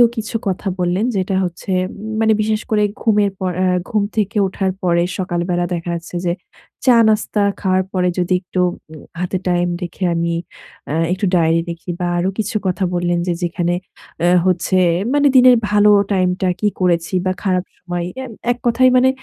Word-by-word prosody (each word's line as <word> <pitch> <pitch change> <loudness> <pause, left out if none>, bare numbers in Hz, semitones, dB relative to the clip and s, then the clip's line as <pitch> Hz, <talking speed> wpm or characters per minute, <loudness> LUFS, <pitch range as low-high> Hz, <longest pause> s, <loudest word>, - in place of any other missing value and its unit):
কিছু 225 -1 -5
কথা 190 +1 -2
বললেন 180 +5 +1
যেটা 190 +1 -1
হচ্ছে 180 +2 -5 0.2
উম 215 +2 -8
মানে 220 0 +4
বিশেষ 215 0 0
করে 210 -1 +2 0.2
ঘুমের 210 -3 +2
পর 185 -1 -1
আ - - +3 0.2
ঘুম 210 -2 +1
থেকে 215 0 0
ওঠার 190 0 -1
পরে 170 -1 +2 0.2
সকালবেলা 175 -1 -1
দেখা 170 0 -4
যাচ্ছে 170 +1 -8
যে 170 - +1 0.5
চা 250 -2 +6
নাস্তা 215 -1 +1 0.2
খাওয়ার 185 -1 +2
পরে 180 -1 +1
যদি 180 +1 +1
একটু 180 0 -4 0.3
উম 155 - -11 0.2
হাতে 180 +1 -1
টাইম 175 0 +1
রেখে 175 +2 -5
আমি 170 0 -1 0.6
আ - - -2 0.2
একটু 195 +3 -2
ডায়েরি 165 0 +3
লেখি 170 +1 -8
বা 180 - -1
আরো 180 +2 +1
কিছু 215 0 -2
কথা 185 +1 -1
বললেন 175 0 0
যে 175 - +1
যেখানে 175 0 -1 0.5
আ - - +4 0.2
হচ্ছে 185 0 +1 0.4
মানে 290 0 +4
দিনের 250 -1 +8
ভালো 210 0 +4 0.2
টাইমটা 185 0 +1
কি 210 - +1
করেছি 175 -1 +1
বা 185 - +2
খারাপ 185 -2 +1
সময়। 175 -1 -4 0.2
এ - - -5 0.3
এক 245 - -2
কথায় 255 +2 +4
মানে 260 +1 +5
185 Hz, 180 wpm, -18 LUFS, 175-210 Hz, 0.6 s, দিনের